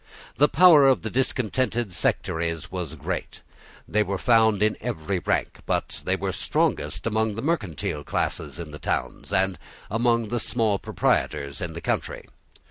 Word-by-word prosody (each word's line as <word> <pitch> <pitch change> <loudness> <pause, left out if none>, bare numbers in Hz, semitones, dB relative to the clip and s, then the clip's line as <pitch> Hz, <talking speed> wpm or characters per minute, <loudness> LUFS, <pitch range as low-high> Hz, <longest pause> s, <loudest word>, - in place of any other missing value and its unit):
The 145 +3 +5
power 160 -4 +7
of 135 -2 +3
the 110 - -3
discontented 120 -4 0
sectaries 80 -1 -1
was 90 -4 -4
great. 70 - -5 0.5
They 105 - +2
were 100 -2 -1
found 110 -2 +4
in 110 - +2
every 95 -5 -2
rank; - - -1
but - - -1
they - - +2
were - - -3
strongest - - -1
among 110 -1 0
the 115 - -5
mercantile 105 - -2
classes - - -2
in 85 -3 -7
the 75 - -9
towns, - - -3
and 95 -3 +1 0.3
among 115 0 +1
the 120 - -1
small 110 -3 0
proprietors 70 +1 -1
in 85 -2 -4
the 85 - -7
country. - - -2
105 Hz, 155 wpm, -25 LUFS, 85-120 Hz, 0.5 s, power